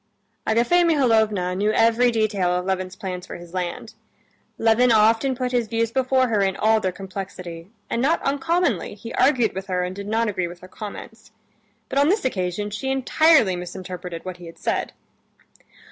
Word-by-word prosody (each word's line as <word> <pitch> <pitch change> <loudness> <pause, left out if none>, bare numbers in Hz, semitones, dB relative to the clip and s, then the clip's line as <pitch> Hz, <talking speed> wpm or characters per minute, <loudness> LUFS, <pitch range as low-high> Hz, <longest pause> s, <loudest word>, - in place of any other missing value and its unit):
Agafea 240 +11 +3
Mihalovna 220 - +2
knew 205 +3 +1
every 230 +3 +4
detail 215 -5 +1
of 180 0 -2
Levin's 185 -1 -2
plans 185 -4 -6
for - - -7
his 175 0 -11
land. 180 -2 -4 0.6
Levin 230 +2 +4
often 225 +4 +4
put 250 0 -2
his 240 -3 0
views 230 0 -1
before 260 0 +2
her 215 -3 +1
in 195 -1 0
all 220 +1 +3
their 190 -3 -1
complexity, 185 -2 -8 0.2
and 235 - -1
not 315 +6 +2
uncommonly 285 - 0
he 230 +3 -9
argued 255 -5 +3
with 190 +1 -6
her 180 -1 -1
and 180 +1 -4
did 200 0 -7
not 225 +2 +1
agree 185 -4 -1
with 175 0 -11
her 185 - -11
comments. 220 +2 -9 0.6
But 275 - 0
on 285 +2 +4
this 405 -2 +1
occasion 200 -2 -2
she 265 +6 -3
entirely 270 - +4
misinterpreted 180 -1 -7
what 185 -1 -6
he 175 -1 -11
had 165 - -12
said. - - -2
215 Hz, 175 wpm, -23 LUFS, 185-245 Hz, 0.6 s, every